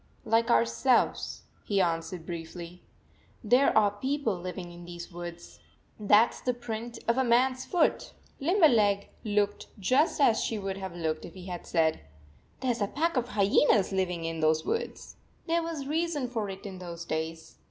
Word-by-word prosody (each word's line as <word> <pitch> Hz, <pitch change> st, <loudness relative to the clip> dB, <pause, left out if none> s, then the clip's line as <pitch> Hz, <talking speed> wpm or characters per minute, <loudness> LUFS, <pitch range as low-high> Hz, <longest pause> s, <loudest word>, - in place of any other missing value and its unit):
" -, -, -33 dB
Like 230 Hz, 0 st, +3 dB
ourselves," 115 Hz, -, +2 dB, 0.2 s
he 200 Hz, -2 st, 0 dB
answered 165 Hz, -1 st, -1 dB
briefly. 170 Hz, +1 st, -7 dB, 0.3 s
" -, -, -33 dB
There 250 Hz, +5 st, +4 dB
are 205 Hz, -2 st, +5 dB
people 260 Hz, +1 st, -1 dB
living 180 Hz, 0 st, -6 dB
in 175 Hz, 0 st, -11 dB
these 175 Hz, +1 st, -8 dB
woods. 175 Hz, 0 st, -9 dB, 0.4 s
That 210 Hz, +2 st, +5 dB
s -, -, -12 dB
the 250 Hz, -1 st, -1 dB
print 235 Hz, 0 st, -6 dB
of 235 Hz, +3 st, +2 dB
a -, -, +3 dB
man 250 Hz, +2 st, +4 dB
s 255 Hz, 0 st, -8 dB
foot." 355 Hz, -, +1 dB, 0.3 s
Limberleg 245 Hz, -, +3 dB
looked 205 Hz, -1 st, 0 dB
just 255 Hz, -, +2 dB
as 240 Hz, -6 st, +4 dB
she 225 Hz, -, -1 dB
would 195 Hz, -1 st, -4 dB
have 190 Hz, -3 st, -6 dB
looked 160 Hz, -2 st, -2 dB
if 170 Hz, -, -10 dB
he 185 Hz, -1 st, -10 dB
had 180 Hz, -2 st, -6 dB
said, 160 Hz, -2 st, +2 dB, 0.3 s
" 65 Hz, -, -32 dB
There 260 Hz, -1 st, +1 dB
s 235 Hz, -2 st, -4 dB
a 205 Hz, -, +2 dB
pack 330 Hz, +8 st, -1 dB
of 250 Hz, -2 st, 0 dB
hyenas 205 Hz, 0 st, +3 dB
living 180 Hz, -3 st, -1 dB
in 165 Hz, 0 st, -3 dB
those 155 Hz, 0 st, +2 dB
woods." 460 Hz, -, -4 dB, 0.3 s
There 335 Hz, 0 st, +1 dB
was 330 Hz, -3 st, -4 dB
89 275 Hz, -, -7 dB
reason 320 Hz, -4 st, 0 dB
for 220 Hz, -4 st, -3 dB
it 195 Hz, +1 st, -8 dB
in 190 Hz, -2 st, -7 dB
those 170 Hz, -1 st, -7 dB
days. 160 Hz, 0 st, -5 dB
200 Hz, 185 wpm, -29 LUFS, 175-250 Hz, 0.4 s, are